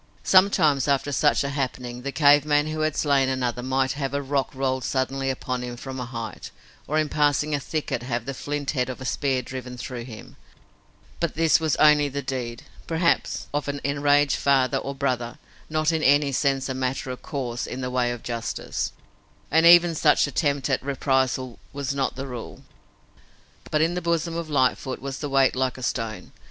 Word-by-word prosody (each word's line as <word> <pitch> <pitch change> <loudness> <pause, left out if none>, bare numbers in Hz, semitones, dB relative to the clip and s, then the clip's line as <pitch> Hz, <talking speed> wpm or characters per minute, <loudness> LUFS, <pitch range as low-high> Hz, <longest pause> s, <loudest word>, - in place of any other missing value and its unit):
Sometimes 155 -8 +4
after 140 0 +1
such 145 +1 +2
a 140 - -2
happening, 125 -3 -4
the 140 +2 -4
cave 145 +1 +5
man 145 0 +2
who 155 0 -4
had 155 -1 0
slain 140 -3 +2
another 125 -2 -1
might 130 +1 0
have 140 0 -3
a 140 - 0
rock 135 -1 0
rolled 130 -1 -1
suddenly 135 0 -1
upon 130 -1 -3
him 120 -1 -6
from 130 +1 -7
a 125 - -4
height, 115 -4 -6 0.4
or 155 - 0
in 155 -1 +2
passing 150 0 +1
a 145 - +1
thicket 145 -3 -3
have 120 -2 -3
the 135 - -4
flint 145 +1 -3
head 125 -3 -1
of 130 - -6
a 130 - -7
spear 130 -1 0
driven 125 0 -7
through 120 -1 -6
him, 110 -3 -11 0.8
but 170 -3 -1
this 165 0 +4
was 160 -2 +1
only 150 -1 +5
the 140 +1 -4
deed, 120 -3 -4 0.2
perhaps, 170 +1 0
of 145 0 -1
an 145 0 -3
enraged 145 0 +2
father 135 -1 +2
or 140 +1 -5
brother, 125 -3 -2 0.3
not 155 +1 +1
in 160 -1 0
any 145 0 +4
sense 135 0 0
a 130 - -2
matter 130 0 -2
of 125 - -7
course 125 -5 -4
in 130 - -5
the 125 0 -3
way 125 -1 +1
of 120 -2 -6
justice, 115 -1 -3 0.6
and 160 +3 +5
even 175 0 +7
such 150 -1 +4
attempt 140 -1 0
at 130 - 0
reprisal 130 -2 -1
was 140 0 -3
not 135 -1 -1
the 135 +1 -5
rule. 125 -4 -8 1.1
But 150 - +1
in 165 +2 +2
the 180 - -2
bosom 170 0 -1
of 165 -1 -4
Lightfoot 130 -2 0
was 135 0 -6
a 145 - -3
weight 135 -1 +3
like 130 0 -1
a 130 - -8
stone. 115 -3 -3
135 Hz, 195 wpm, -24 LUFS, 130-145 Hz, 1.1 s, even